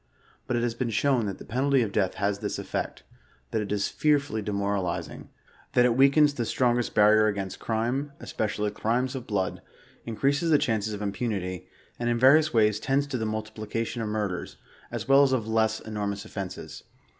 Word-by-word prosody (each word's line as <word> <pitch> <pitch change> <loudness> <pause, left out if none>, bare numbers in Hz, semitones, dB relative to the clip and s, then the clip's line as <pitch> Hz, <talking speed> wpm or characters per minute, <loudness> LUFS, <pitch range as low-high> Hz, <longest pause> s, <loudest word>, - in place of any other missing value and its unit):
But 125 - 0
it 120 - 0
has 120 -1 0
been 120 +1 -2
shown 120 0 +1
that 95 - -4
the - - -11
penalty 135 +2 +2
of 105 - -3
death 100 -3 0
has 100 0 -1
this - - -3
effect; - - -4 0.5
that 110 - 0
it 100 - -5
is 105 -1 +1
fearfully 145 -6 +1
de 105 - -4
118 100 0 -1
mOTalisiiig, 100 -3 -3 0.5
that 125 - +5
it 120 -2 +3
weakens 140 +3 +5
the 120 - -2
strongest 120 +1 0
barrier 110 +1 +6
against 100 -2 -3
crimei 120 +6 -1
especially 105 -1 -2
crimes 120 +5 -1
of 130 -2 -6
blood, 95 -4 -1 0.4
increases 140 +8 0
the 155 - +6
chances 110 -6 -1
of 105 - -6
impunity, 100 -4 -3 0.3
and 120 0 0
in 120 - +1
rarious 150 +5 +6
wa3r8 110 -2 +3
tends 135 +4 +1
to 135 -4 -4
the 110 - -1
multiplication 110 +2 -4
of 110 - -2
murders, 105 -4 -3 0.3
as - - -4
Dvell 135 +1 +6
as 135 -1 +2
of 115 -4 0
less 110 0 +1
enormous 105 -2 -4
offenses. 95 -3 -7
110 Hz, 190 wpm, -27 LUFS, 105-130 Hz, 0.5 s, barrier